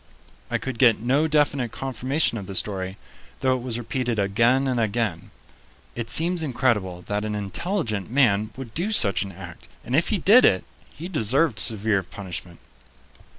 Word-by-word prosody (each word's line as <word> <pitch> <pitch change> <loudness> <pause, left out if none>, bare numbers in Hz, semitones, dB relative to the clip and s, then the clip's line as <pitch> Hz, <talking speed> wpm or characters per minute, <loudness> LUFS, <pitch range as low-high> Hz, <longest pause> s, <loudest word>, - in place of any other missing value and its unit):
I - - 0
could 130 -3 -6
get 120 -4 +5
no 135 +7 +1
definite 145 -5 +1
confirmation 130 +1 -1
of 95 - -9
the 100 - -7
story, 95 -1 -2 0.4
though 130 -1 +2
it 125 - -4
was 120 -2 -3
repeated 120 0 -2
again 115 +7 +2
and 125 -2 0
again. 105 -5 -2 0.6
It 120 -1 -5
seems 170 +5 +3
incredible 115 - -1
that 105 +1 -2
an 105 -1 -3
intelligent 110 - -3
man 110 -5 +2
would 125 -5 -8
do 185 +7 -1
such 100 - +4
an 100 - -4
act, 90 -1 -11 0.2
and 125 - -1
if 160 - +2
he 215 - +1
did 210 +8 +6
it, 95 - +4 0.3
he 165 +4 -9
deserved 140 - +1
severe 105 -2 +2
punishment. 90 -2 -8
120 Hz, 165 wpm, -24 LUFS, 100-135 Hz, 0.6 s, did